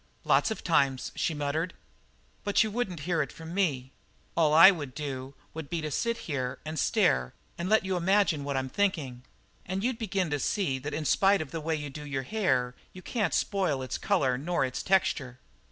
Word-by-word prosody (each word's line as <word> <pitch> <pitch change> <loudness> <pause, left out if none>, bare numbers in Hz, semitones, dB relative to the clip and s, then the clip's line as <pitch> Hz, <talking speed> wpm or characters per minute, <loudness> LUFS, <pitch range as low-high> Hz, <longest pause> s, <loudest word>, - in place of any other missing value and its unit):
"Lots - - +3
of 220 - -5
times," 140 -6 +1
she 160 - -1
muttered. 150 +5 -2 0.7
"But 205 +1 +3
you 220 - -3
wouldn't 200 -8 -3
hear 165 0 0
it 140 - -3
from 165 +1 -9
me. 140 -10 0 0.4
All 160 -3 +3
I 165 +5 +10
would 145 -8 -6
do 135 -2 -5 0.2
would 160 -3 -7
be 170 -1 -2
to 155 -1 -4
sit 235 +9 -2 0.4
and 155 0 -4
stare 65 -1 +2 0.2
and 175 +2 -3
let 220 -2 +4
you 190 -1 -1
imagine 180 -4 +2
what 140 -1 -2
I'm 130 0 -1
thinking. 155 -10 -1 0.4
And 190 +2 -3
you'd 250 -1 -1
begin 190 -6 -1
to 145 - 0
see 140 -6 0
that 145 +3 -5
in 155 - -3
spite 195 +5 +4
of 155 -4 -5
the 165 - -4
way 160 +1 -1
you 145 -2 -5
do 150 +2 -8
your 135 -2 -3
hair 130 - 0 0.2
you 185 - -11
can't 210 -8 -1
spoil 180 -10 0
its 130 - -4
colour 135 -11 +1
nor 170 0 0
its 130 -1 -4
texture." 140 -9 +1
160 Hz, 200 wpm, -29 LUFS, 140-190 Hz, 0.7 s, I